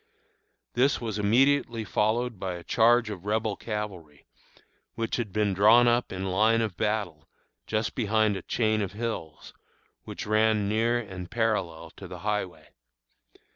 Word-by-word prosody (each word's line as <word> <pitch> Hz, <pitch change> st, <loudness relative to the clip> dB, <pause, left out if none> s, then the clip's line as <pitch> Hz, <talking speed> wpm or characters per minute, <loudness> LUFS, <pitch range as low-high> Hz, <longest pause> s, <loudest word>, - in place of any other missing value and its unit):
This 130 Hz, +3 st, +2 dB
was 110 Hz, -3 st, -4 dB
immediately 120 Hz, +2 st, +2 dB
followed 110 Hz, +2 st, 0 dB
by 95 Hz, -2 st, -3 dB
a 85 Hz, -, -9 dB
charge 115 Hz, +1 st, +3 dB
of 95 Hz, -4 st, -8 dB
Rebel 110 Hz, 0 st, -1 dB
cavalry, 95 Hz, -9 st, -6 dB, 0.7 s
which 115 Hz, 0 st, -2 dB
had 115 Hz, -5 st, -3 dB
been 105 Hz, 0 st, 0 dB
drawn 110 Hz, +5 st, +6 dB
up 120 Hz, +1 st, +1 dB
in 95 Hz, 0 st, -3 dB
line 110 Hz, +4 st, +3 dB
of 110 Hz, -5 st, -2 dB
battle 100 Hz, -9 st, -2 dB, 0.4 s
just 110 Hz, +1 st, -1 dB
behind 110 Hz, -2 st, +1 dB
a 95 Hz, -, -5 dB
chain 110 Hz, +2 st, 0 dB
of 100 Hz, -1 st, -3 dB
hills 100 Hz, -9 st, -5 dB, 0.5 s
which -, -, -7 dB
ran 110 Hz, -1 st, +2 dB
near 115 Hz, +3 st, +1 dB
and 95 Hz, -6 st, -7 dB
parallel 85 Hz, -8 st, -2 dB
to 95 Hz, -, -9 dB
the 90 Hz, 0 st, -8 dB
highway. 95 Hz, -7 st, -3 dB
105 Hz, 145 wpm, -27 LUFS, 95-115 Hz, 0.7 s, drawn